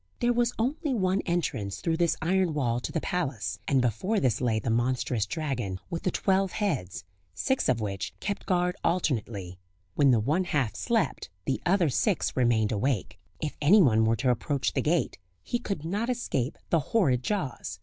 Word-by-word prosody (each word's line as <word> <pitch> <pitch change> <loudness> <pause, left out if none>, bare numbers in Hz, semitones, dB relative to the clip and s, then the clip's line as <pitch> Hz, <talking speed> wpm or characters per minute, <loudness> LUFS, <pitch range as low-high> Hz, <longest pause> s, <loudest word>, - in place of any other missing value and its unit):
There 240 0 +2
was 240 0 +2
only 275 +4 -1
one 190 -2 +1
entrance 130 - -1
through 165 -1 0
this 170 -1 +2
iron 180 -1 +1
wall 120 -5 +1
to - - -5
the 165 - -1
palace, 120 - -2
and 135 -2 +3
before 185 - 0
this 130 -2 +1
lay 115 -3 +1
the 110 +1 -1
monstrous 120 -2 0
dragon 125 - -3
with 170 - -3
the - - 0
twelve 190 0 +1
heads, 140 - -2 0.3
six 265 - 0
of 125 -2 +2
which 100 -3 -3
kept 200 -1 -4
guard 180 -1 +1
alternately; 110 - -1 0.3
when 140 +4 +4
the 120 -3 +5
one 150 - +1
half 140 -10 0
slept 230 - -1 0.2
the 135 - -1
other 175 -3 +3
six 190 - 0
remained 120 -4 +2
awake. 110 -3 -1 0.2
If 155 -2 -3
anyone 145 - +5
were 110 +1 +3
to 130 +1 +2
approach 135 +3 -1
the - - +1
gate 165 -6 0 0.2
he 240 - -2
could 195 -10 -4
not 205 +8 -1
escape 150 - -1
the 165 - +4
horrid 140 - +2
jaws. 130 - -3
145 Hz, 180 wpm, -28 LUFS, 115-185 Hz, 0.3 s, the